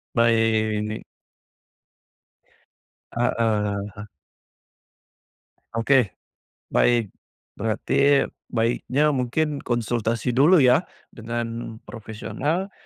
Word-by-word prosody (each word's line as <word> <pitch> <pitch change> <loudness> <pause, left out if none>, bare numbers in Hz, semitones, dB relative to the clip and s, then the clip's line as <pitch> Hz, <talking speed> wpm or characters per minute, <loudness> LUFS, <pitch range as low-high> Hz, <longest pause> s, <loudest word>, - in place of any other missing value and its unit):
Baik, 115 -2 +3
ini 105 +1 -4 2.1
Heeh, 110 -4 0 0.2
he 105 0 -8 1.7
Oke. 115 -2 +2 0.5
Baik. 120 -5 +2 0.4
Berarti 135 +6 +2 0.2
baiknya 125 +5 +1
mungkin 140 +3 -1
konsultasi 120 0 -1
dulu 155 +6 +6
ya 130 +7 +5 0.3
dengan 115 0 -5
profesional, 135 - -4
115 Hz, 65 wpm, -24 LUFS, 110-135 Hz, 2.1 s, dulu